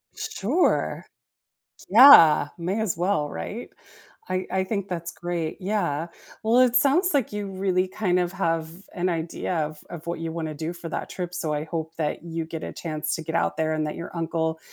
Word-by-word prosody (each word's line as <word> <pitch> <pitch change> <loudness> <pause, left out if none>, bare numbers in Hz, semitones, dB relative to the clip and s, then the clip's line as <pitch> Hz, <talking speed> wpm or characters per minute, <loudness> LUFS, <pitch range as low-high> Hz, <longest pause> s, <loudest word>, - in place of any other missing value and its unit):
Sure. 265 - 0 0.9
Yeah, 185 - +9
may 185 +6 -1
as 205 -7 -1
well, 175 -4 0
right? 80 - -6 0.6
I 185 0 -1
I 190 0 +1
think 200 0 -3
that's 170 -2 -4
great, 170 -2 -3
yeah. 175 -5 -1 0.3
Well, 225 +3 +3
it 250 -1 +4
sounds 320 +7 +3
like 265 -7 +1
you 205 -1 -3
really 185 -1 0
kinda 180 -2 0
have 165 -3 0 0.3
an 180 +1 0
idea 165 +1 -2
of 155 0 -10
of 170 -1 -9
what 170 - -3
you 165 -1 -3
wanna 160 -2 -4
do 160 +3 -4
for 170 -1 -8
that - - -4
trip, 180 -1 -5
so 165 -3 -2
I 150 +1 -2
hope 160 0 -5
that 155 -1 -2
you 165 -1 -3
get 160 0 -7
a - - -6
chance 155 -2 -3
to 160 - -4
get 160 +1 -5
out - - +1
there, 155 0 0
and 155 -1 -1
that 150 - -4
your 170 - -7
uncle 160 -1 -1
170 Hz, 190 wpm, -25 LUFS, 160-190 Hz, 0.9 s, Yeah